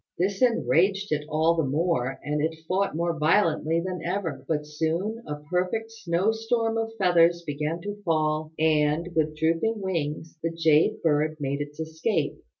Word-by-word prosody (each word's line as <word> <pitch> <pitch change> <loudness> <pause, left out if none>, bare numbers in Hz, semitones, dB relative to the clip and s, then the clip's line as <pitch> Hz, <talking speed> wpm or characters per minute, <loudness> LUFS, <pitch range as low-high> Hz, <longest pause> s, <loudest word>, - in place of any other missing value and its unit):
This 195 +4 -1
enraged 195 -5 +2
it 150 -1 -1
all 160 +2 +3
the 165 - +1
more, 135 -3 0
and 150 +1 -1
it 160 +1 -1
fought 190 0 0
more 170 -1 -1
violently 165 -1 +2
than 185 -1 -3
ever; 175 -2 -3
but 150 -2 -1
soon 165 +9 -2
a 150 0 -6
perfect 185 +6 -1
snowstorm 225 +4 0
of 225 0 -2
feathers 170 -2 +4
began 150 +3 -3
to 205 +1 -6
fall, 155 -3 0
and, 155 +1 +2
with 155 -1 0
drooping 165 +8 +1
wings, 160 -4 -3
the 165 - 0
Jade 160 -2 +2
bird 155 0 +1
made 140 0 -2
its 145 +1 -7
escape. 160 +7 -1
165 Hz, 155 wpm, -26 LUFS, 155-190 Hz, -, feathers